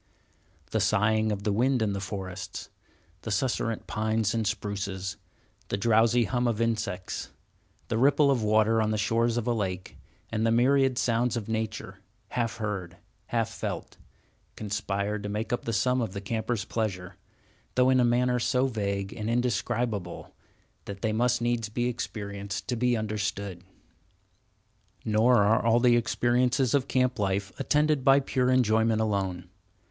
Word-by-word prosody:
The 110 - +1
sighing 110 +1 +2
of 100 -1 -3
the 105 - +1
wind 125 +4 +2
in 110 -3 0
the 100 - -3
forests, 95 -2 -6 0.5
the - - -6
susurrant 115 +1 -1
pines 110 0 0
and 115 -2 0
spruces, 100 -2 -3 0.5
the - - -1
drowsy 115 +2 +3
hum 120 +2 0
of 115 -2 -1
insects, 110 -5 -2 0.6
the 110 - -1
ripple 140 +2 +4
of 130 -4 +1
water 110 +1 +3
on 110 - +1
the 110 - 0
shores 115 +3 +1
of 120 - -1
a 120 - +1
lake, 95 -4 -4 0.3
and 110 -1 -1
the 115 - +3
myriad 130 +2 +3
sounds 120 0 +1
of 110 - -5
nature—half 110 +1 -4
heard, 95 -6 -4 0.3
half - - 0
felt—conspire 105 0 -5
to 105 0 -5
make 105 +3 -2
up 120 - -2
the 115 - -1
sum 125 +5 +1
of 110 -5 -3
the 100 - -4
camper's 110 +1 -2
pleasure; 95 -6 -3 0.6
though 130 0 +4
in 130 - +4
a - - +4
manner 125 +1 +2
so 125 +2 +2
vague 100 -4 -2
and 110 0 -4
indescribable 115 -5 -1 0.5
that 100 -1 -8
they 110 -1 +1
must 120 +1 +1
needs 120 -2 0
be 120 +3 -1
experienced 100 -4 -4
to 125 - -1
be 120 0 +1
understood. 100 -4 -3 1.4
Nor 110 +1 +4
are 110 +4 +3
all 115 +1 +4
the 120 -1 +5
experiences 120 +2 +1
of 140 -3 +2
camp 125 -2 +1
life 100 0 -1
attended 150 -2 +2
by 135 +2 +6
pure 130 -2 0
enjoyment 115 -3 +3
alone. 95 -5 -1
110 Hz, 150 wpm, -27 LUFS, 100-120 Hz, 1.4 s, by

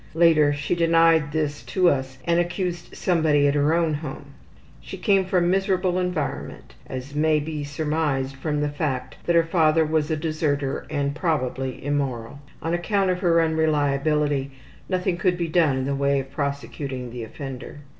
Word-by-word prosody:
Later 160 -3 +5
she 145 +3 -2
denied 165 -2 +4
this 150 -2 -2
to 185 -2 +2
us 130 -4 0
and 170 0 +2
accused 175 0 -3
somebody 155 -5 +3
at 140 - +2
her 145 +2 +2
own 165 -2 +1
home. 145 -1 -6 0.5
She - - -8
came 195 -4 +2
from 180 -2 +2
miserable 185 -1 +1
environment, 180 -7 -4
as 130 +2 -6
may 155 +1 +2
be 150 0 -4
surmised 145 -2 -1
from 150 +2 -2
the 150 - 0
fact 140 -4 -3
that 170 - +2
her 165 - +6
father 160 -1 +3
was 155 -1 0
a 155 - 0
deserter 150 -3 -1
and 140 -2 -1
probably 135 -6 -2
immoral. 140 -3 -2 0.2
On 165 +2 -1
account 190 +2 +1
of 180 - -2
her 170 -2 +3
unreliability 150 -2 +1 0.4
nothing 180 -2 0
could 180 0 +1
be 170 -1 -1
done 155 -5 +2
in 130 - -1
the 140 - -1
way 140 0 +1
of 135 0 -7
prosecuting 140 -3 -4
the 120 -1 -6
offender. 135 +4 -8
150 Hz, 165 wpm, -24 LUFS, 140-170 Hz, 0.5 s, her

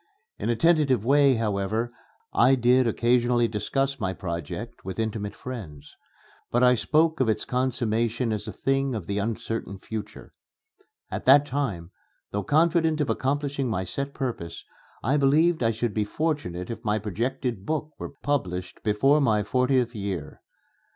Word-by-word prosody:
In - - -2
a 120 - +2
tentative 140 - +3
way, 140 0 +5
however, 110 +2 -1 0.4
I 135 +2 +5
did 125 0 +4
occasionally 120 +1 +2
discuss 135 +6 -1
my 95 -4 -1
project 85 -4 -6
with 95 0 -6
intimate 110 -2 -3
friends; 85 - -8 0.5
but 120 +1 +2
I 125 0 +7
spoke 160 +7 +2
of 130 -4 +2
its 110 - 0
consummation 120 -2 0
as 105 - -4
a - - -3
thing 135 +4 0
of 105 -6 -4
the 100 +2 -2
uncertain 110 -1 -3
future. 110 +2 -8 0.8
At - - -4
that 140 +2 +7
time, 110 -12 -3 0.4
though 100 - -1
confident 160 - +2
of 140 -6 +1
accomplishing 140 +1 -1
my 95 -4 -1
set 140 +9 -4
purpose, 100 -11 -4 0.4
I 135 +6 +2
believed 155 +4 +3
I 115 - +3
should 115 0 -1
be 105 - +1
fortunate 120 - -2
if 115 0 -7
my 105 -2 +1
projected 115 +2 -3
book 155 +5 -2
were - - -7
published 90 -11 -2
before 135 +8 +3
my 110 -6 +2
fortieth 125 +2 +1
year. 100 -4 -5
120 Hz, 150 wpm, -26 LUFS, 105-135 Hz, 0.8 s, I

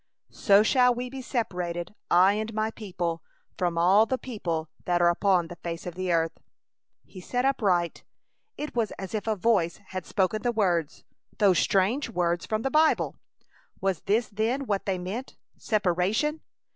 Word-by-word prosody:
So 200 0 +5
shall 250 +2 +4
we 250 +1 -5
be 265 0 -6
separated, 180 -8 -3 0.2
I 185 +3 +5
and 215 +1 -3
my 215 0 0
people, 180 -6 -4 0.3
from 175 -2 -1
all 190 +6 +5
the 260 - 0
people 170 -11 -4 0.2
that 175 -1 +1
are 175 0 +5
upon 180 -1 +2
the 175 - -10
face 170 0 -6
of 180 - -5
the 185 0 -2
earth! 165 -1 0 0.7
He 185 - -11
started 250 +7 0
upright! 180 -10 0 0.5
It 295 0 -5
was 230 -3 0
as 190 +1 -7
if 215 0 -3
a 220 - +1
Voice 195 -5 +1
had 185 0 -5
spoken 205 +2 0
the 240 - +1
words, 175 -8 0 0.3
those 195 -4 +4
strange 215 +9 +1
words 175 -4 -1
from 215 0 -1
the 270 - -1
Bible! 310 +2 +3 0.6
Was 190 -4 -1
this 220 +3 +1
then 225 +6 -1
what 200 -4 -2
they 190 -2 0
meant? 195 +9 -6 0.2
Separation! 210 - 0
200 Hz, 170 wpm, -27 LUFS, 175-225 Hz, 0.7 s, So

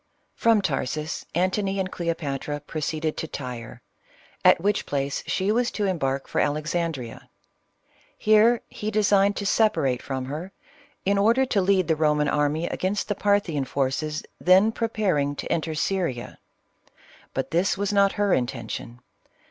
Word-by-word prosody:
From 225 -3 +3
Tarsus 155 -1 -2
Antony 195 +2 0
and 185 -1 -2
Cleopatra 145 -4 -3
proceeded 155 +1 -3
to 160 - -3
Tyre, 125 -5 -7 0.6
at - - +6
which 205 +4 0
place 140 -1 -2
she 195 +2 0
was 240 +2 +2
to 210 - -2
embark 135 -8 -1
for - - 0
Alexan 155 +3 0
drea. 125 -6 -9 0.9
Here 215 +2 +4
he 210 - -5
designed 205 -2 +3
to 200 - -4
separate 195 - +2
from 130 -2 -4
her, 155 +8 -6 0.5
in 200 +1 +2
order 230 +6 +4
to 205 -6 +1
lead 190 -1 +2
the 165 - +3
Eoman 150 -1 +2
army 150 +2 +1
against 195 +5 -2
the - - +2
Parthian 200 -8 +1
forces 140 +3 -2 0.2
then 190 +5 +5
preparing 195 -12 0
to - - -5
'enter 160 -1 -1
Syria. 160 -7 -2 1.0
But 135 - -2
this 175 +2 +1
was 200 +1 -1
not 200 -1 +4
her 205 -2 +1
intention. 120 -1 -3
170 Hz, 145 wpm, -25 LUFS, 145-200 Hz, 1.0 s, at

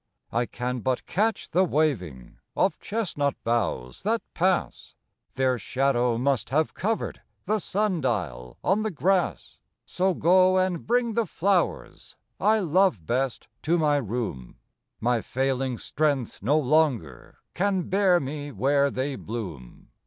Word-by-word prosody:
I 120 +1 0
can 125 +1 -3
but 130 +2 -1
catch 220 +3 -1
the 185 +3 +4
waving 115 - -1 0.2
Of - - +1
chestnut 160 - -1
boughs 105 - -1
that 225 +3 0
pass, 185 +1 -1 0.4
Their 130 -2 +1
shadow 125 0 +1
must 130 -3 0
have 155 +4 +1
covered 220 +3 -2 0.2
The 215 +1 +1
sun 195 -3 -1
dial 75 - -3
on 195 +4 +2
the 220 - -1
grass. 185 +1 0 0.3
So 185 0 0
go 185 +3 +4
and 185 -2 0
bring 240 0 +2
the 230 0 0
flowers 185 0 -1 0.2
I 215 +1 +4
love 180 - +2
best 130 +3 -1
to 170 +3 +2
my 150 -3 +3
room, 110 - -4 0.4
My 120 0 +1
failing 130 0 -1
strength 140 -4 -1
no 140 +10 +2
longer 135 - 0 0.2
Can 190 0 +1
bear 190 -2 +3
me 145 +1 -5
where 140 +5 +2
they 135 +1 -2
bloom. 90 - -7
145 Hz, 135 wpm, -26 LUFS, 120-185 Hz, 0.4 s, the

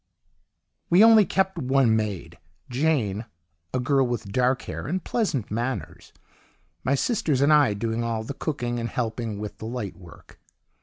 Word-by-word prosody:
"We 180 +5 +6
only 225 -2 +7
kept 190 -1 0
one 130 -4 +3
maid, 105 -4 -3 0.3
Jane 120 -7 0 0.5
(a 130 - -1
girl 135 +1 +2
with 120 -5 -4
dark 125 +3 +1
hair - - -6
and 180 +3 -2
pleasant 160 - -1
manners), 115 -7 -4 0.7
my 135 - +2
sisters 150 - 0
and 140 +3 +5
I 145 -8 +4
doing 115 +2 -2
all 115 -1 -2
the 125 - -5
cooking 120 -5 -3
and 115 0 -3
helping 115 -2 -3
with 105 0 -7
the - - -7
light 115 -4 -4
work. 85 -3 -16
125 Hz, 155 wpm, -25 LUFS, 110-145 Hz, 0.7 s, only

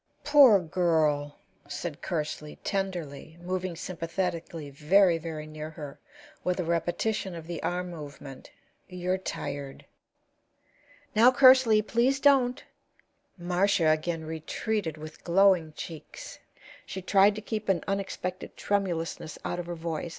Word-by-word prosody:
"Poor 280 -8 +7
girl!" 155 -4 +1 0.3
said 145 +2 -5
Kersley, 150 -3 -4
tenderly, 175 -6 -4
moving 180 0 -3
sympathetically 170 -3 -4
very, 170 +5 +4
very 155 -2 -6
near 155 0 -7
her, 150 -3 -9 0.4
with 180 0 -1
a - - +1
repetition 175 +3 -1
of 165 -1 -8
the 170 -1 -5
arm 180 0 -2
movement. 145 -4 -10 0.4
"You're 180 +1 -2
tired." 140 -6 -6 1.3
"Now, 235 +4 +7
Kersley, 255 -5 +6
please 245 +5 +1
don't." 265 -3 +3 0.7
Marcia 175 -1 +2
again 160 +1 0
retreated 160 +2 -3
with 155 0 -10
glowing 180 -2 +4
cheeks. 170 - -9 0.4
She 190 -1 -7
tried 200 +2 +4
to 215 - -6
keep 215 -1 -4
an 180 -4 +2
unexpected 190 -2 -4
tremulousness 170 -6 -2
out 175 - -2
of 175 - -5
her 175 - -4
voice. 165 0 -4
175 Hz, 120 wpm, -28 LUFS, 160-195 Hz, 1.3 s, Poor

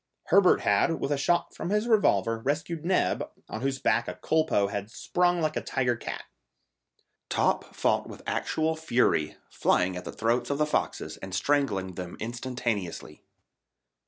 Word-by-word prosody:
Herbert 195 -2 +5
had, 165 -3 +2
with 140 - -2
a - - +3
shot 175 +4 +1
from 170 - -5
his 210 +3 +1
revolver, 115 - +3
rescued 150 +6 -2
Neb, 185 +2 +1 0.2
on 110 - -6
whose 135 0 0
back 120 -3 +1
a - - -4
culpeux 160 -10 +1
had 100 +1 -4
sprung 175 +8 +1
like 155 -1 0
a - - -1
tiger 125 -2 0
cat. - - -6 1.1
Top - - 0
fought - - +1
with - - -10
actual 160 0 0
fury, 125 - +1
flying 90 +1 +2
at 90 - -5
the - - -6
throats 120 +2 0
of 140 - 0
the 150 - +2
foxes 150 - -2
and 95 0 -6
strangling 100 -8 0
them 90 -1 -7
instantaneously. 120 -5 -4
135 Hz, 160 wpm, -28 LUFS, 110-160 Hz, 1.1 s, Herbert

